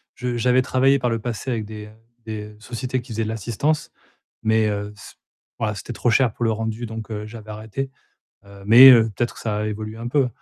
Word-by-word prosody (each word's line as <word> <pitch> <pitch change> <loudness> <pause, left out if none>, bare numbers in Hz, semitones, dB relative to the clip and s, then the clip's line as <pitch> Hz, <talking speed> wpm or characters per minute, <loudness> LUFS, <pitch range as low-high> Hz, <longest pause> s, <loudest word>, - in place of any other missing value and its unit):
Je 125 -1 -3
j'avais 125 +2 +3
travaillé 135 +2 +3
par 125 -2 0
le 115 - -1
passé 120 +3 -4
avec 110 -3 -2
des, 105 0 -8
heu, 105 - -15 0.3
des 105 -1 -6
sociétés 125 +3 -3
qui 120 -1 -13
faisaient 115 +1 -1
de - - -3
l'assistance, 120 +8 -1 0.5
mais 110 0 +3
heu, 105 0 -4
c 95 - -13 0.5
voilà, 105 -2 -1
c'était 120 +4 -7
trop 120 - 0
cher 120 -1 +3
pour 120 - -2
le 115 - +2
rendu 110 +1 -3
donc, 110 0 -7
heu, 105 0 -5
j'avais 110 -1 -10
arrêté, 110 +6 -5 0.5
heu 100 0 -14
mais 125 +5 +10
heu, 115 -3 +6
peut-être 120 - -1
que - - -11
ça 105 -2 -2
a 105 - -1
évolué 110 +1 -5
un 115 +1 -5
peu. 135 0 +2
110 Hz, 225 wpm, -22 LUFS, 105-125 Hz, 0.5 s, mais